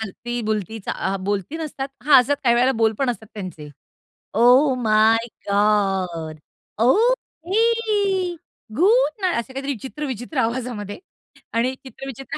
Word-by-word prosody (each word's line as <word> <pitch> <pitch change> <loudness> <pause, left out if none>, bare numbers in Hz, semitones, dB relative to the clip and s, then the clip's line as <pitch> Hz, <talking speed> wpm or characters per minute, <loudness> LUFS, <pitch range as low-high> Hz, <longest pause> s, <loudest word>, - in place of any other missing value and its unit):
हलती, 240 +3 -5
बुलती 215 0 -2
चा - - -2
आ, 195 +1 -2
बोलती 200 - -3
नसतात 285 -4 -5
हां, 275 -1 +7
असतं 275 +4 +1
काही 235 -1 +5
वेळेला 255 +2 +3
बोल 220 0 +4
पण 265 -3 +1
असतात 220 -2 -7
त्यांचे. 180 -7 -7 0.7
Oh 250 +5 +5
my 220 +1 +3 0.2
God, 195 -6 +1 0.5
okay, 410 - +1 0.4
good 405 - +3
night 370 -2 +1
असे 260 +3 -7
काहीतरी 275 +1 -3
चित्र 295 +3 -6
विचित्र 255 +2 -6
आवाजामध्ये 230 - -3 0.5
आणि 240 +3 +1
चित्र 270 0 -11
विचित्र 270 0 -7
245 Hz, 135 wpm, -22 LUFS, 215-300 Hz, 0.7 s, हां